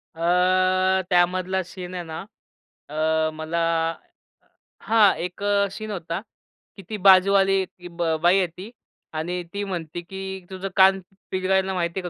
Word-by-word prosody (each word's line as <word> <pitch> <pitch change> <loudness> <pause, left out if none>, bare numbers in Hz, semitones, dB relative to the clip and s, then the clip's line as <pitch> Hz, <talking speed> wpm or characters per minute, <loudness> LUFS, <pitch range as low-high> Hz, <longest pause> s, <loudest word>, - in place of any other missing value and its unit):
अ, 185 +2 +2
त्यामधला 185 +1 +2
सीन 180 0 -9
आहे 175 - -4
ना 160 -1 -7 0.7
अ, 155 +1 +1
मला 160 +2 -3 1.2
हां, 220 -3 +4
एक 180 +3 -6
अ, 200 0 +2
सीन 215 +1 -6
होता 170 -2 -4 0.6
की 195 - -10
ती 215 - -3
बाजूवाली 195 0 +5
ती 180 -1 -14
ब 170 -2 -1
बाई 180 +3 +5
येती 185 +4 -3 0.5
आणि 175 +2 -3
ती 205 0 -3
म्हणते 175 -3 -5
की 190 +1 -7
तुझं 190 +1 -5
कान 190 0 +6 0.3
पिरगाळायला 190 0 +1
माहिती 170 +1 -2
आहे 180 -1 -5
185 Hz, 140 wpm, -24 LUFS, 175-195 Hz, 1.2 s, कान